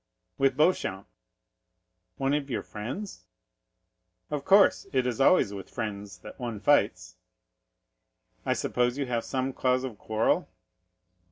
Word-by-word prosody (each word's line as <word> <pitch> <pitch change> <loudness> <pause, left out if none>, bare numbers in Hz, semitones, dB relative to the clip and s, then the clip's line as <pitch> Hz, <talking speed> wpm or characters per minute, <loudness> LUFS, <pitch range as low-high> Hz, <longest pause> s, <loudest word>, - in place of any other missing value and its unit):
"With 135 -1 +2
Beauchamp." 150 - +1 1.1
"One 135 +1 0
of 145 -1 -1
your 120 - -2
friends!" 115 - -7 1.1
"Of 145 -2 -2
course; 200 +1 +5
it 130 -2 +1
is 125 +1 -1
always 135 - +4
with 95 -2 -8
friends 100 -3 -5
that - - -11
one 120 -4 -4
fights." 95 -8 +2 1.3
"I - - +1
suppose 125 +1 0
you 140 - -1
have 120 -2 -1
some 130 0 -2
cause 130 0 +1
of 125 -6 -6
quarrel?" 110 -3 0
125 Hz, 125 wpm, -28 LUFS, 105-135 Hz, 1.3 s, course